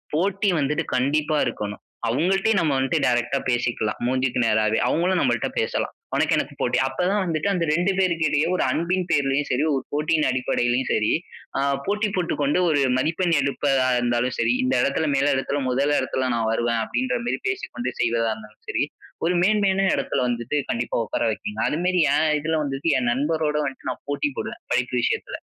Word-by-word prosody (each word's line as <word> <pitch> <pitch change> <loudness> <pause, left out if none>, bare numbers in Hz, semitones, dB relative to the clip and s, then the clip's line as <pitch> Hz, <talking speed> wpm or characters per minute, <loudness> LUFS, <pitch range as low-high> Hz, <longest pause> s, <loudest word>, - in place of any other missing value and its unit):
போட்டி 195 +4 +1
வந்துட்டு 150 +4 0
கண்டிப்பா 150 +4 +1
இருக்கணும். 105 0 -5 0.2
அவங்கள்ட்டே 190 - +2
நம்ம 160 -4 +2
வன்ட்டு 135 0 +1
டைரக்ட்டா 120 +2 +1
பேசிக்கலாம். 120 -3 0
மூஞ்சிக்கு 130 0 0
நேராவே. 110 -1 +2
அவங்களும் 180 +3 +1
நம்மள்ட்ட - - +1
பேசலாம். 465 - -1 0.2
உனக்கு - - +2
எனக்கு - - -2
போட்டி. - - +1
அப்ப - - -5
தான் 205 0 +1
வந்துட்டு 165 +1 -1
அந்த 175 - 0
2 175 +5 +2
பேருக்கிடையே 160 -5 +2
ஒரு - - +1
அன்பின் 180 +2 0
பெயரிலேயும் 140 -1 +1
சரி, - - +1
ஒரு 135 -2 -1
போட்டியின் 155 +1 +1
அடிப்படையிலயும் 125 0 0
சரி, 105 - +1 0.5
ஆ - - +1 0.3
போட்டி 210 +1 +1
போட்டுக்கொண்டு 165 -3 0
ஒரு 150 -2 +2 0.2
மதிப்பெண் 165 +5 +1
எடுப்பதா 135 -1 +1
இருந்தாலும் 120 +1 0
சரி, 115 +1 +2
"இந்த 130 +1 +1
இடத்தில 145 +3 0
மேல 140 +1 +2
இடத்தில 140 +2 -1
1 140 +3 +1
இடத்தில 130 0 -1
நான் 115 -1 0
வருவேன்." 115 0 0
அப்படீன்ற 255 - -1
மாரி - - 0
பேசிக்கொண்டு 255 - -4
செய்வதா 115 -1 +1
இருந்தாலும் 110 0 -14
சரி, - - +1 0.4
ஒரு 180 +2 +2
மேன்மையான 195 -1 +2
இடத்தில 140 - -1
வந்துட்டு 120 +4 -2
கண்டிப்பா 120 +1 -2
உட்கார - - -2
வைக்குங்க. 105 0 -4
அதுமாரி 180 +3 +1
என் 155 +1 +2
இதுல 160 +2 -1
வந்துட்டு, 140 +1 -3
என் 125 -2 0
நண்பரோடு 150 +3 0
வந்துட்டு 135 -2 -4
நான் - - -9
போட்டி 145 +1 0
போடுவேன், - - -5
படிப்பு 125 0 0
விஷயத்தில. - - -1
140 Hz, 170 wpm, -23 LUFS, 125-170 Hz, 0.5 s, அவங்கள்ட்டே